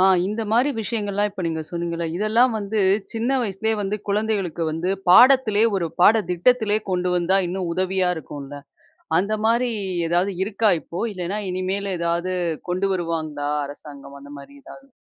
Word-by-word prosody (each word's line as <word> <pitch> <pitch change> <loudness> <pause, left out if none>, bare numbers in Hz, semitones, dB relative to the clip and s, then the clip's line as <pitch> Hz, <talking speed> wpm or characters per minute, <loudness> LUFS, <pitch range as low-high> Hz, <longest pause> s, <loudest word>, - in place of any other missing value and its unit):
ஆ - - +4 0.2
இந்தமாரி 225 +6 +1
விஷயங்கள்லாம், 205 -2 -1
இப்ப 195 -2 -7
நீங்க 160 -1 -2
சொன்னீங்கல்ல. 170 -1 -3
இதெல்லாம் 225 +5 +3
வந்து, 210 +1 -2 0.3
சின்ன 240 +4 0
வயசுலே 220 +1 -1
வந்து 205 +1 -2
குழந்தைகளுக்கு 200 -5 -1
வந்து 165 +4 -2 0.2
பாடத்திலே, 235 +1 +6
ஒரு 170 -4 -1
பாடத்திட்டத்திலே 210 +3 +3
கொண்டு 180 0 0
வந்தா, 180 +2 +2
இன்னும் 180 -1 -3
உதவியா 185 0 0
இருக்கும்ல. 145 -2 -8 0.6
அந்தமாரி 220 +5 +1 0.4
ஏதாவது 175 +4 +1
இருக்கா 210 +1 +1
இப்போ? 170 - -6
இல்லன்னா, 185 +3 -3
இனிமேலு 190 +2 -2
எதாவது 170 +2 -1 0.4
கொண்டு 185 +2 0
வருவாங்களா 155 -5 -3 0.2
அரசாங்கம், 140 -1 -11
அந்தமாரி 140 - -12
ஏதாவது? 270 - -14
190 Hz, 130 wpm, -22 LUFS, 170-215 Hz, 0.6 s, பாடத்திலே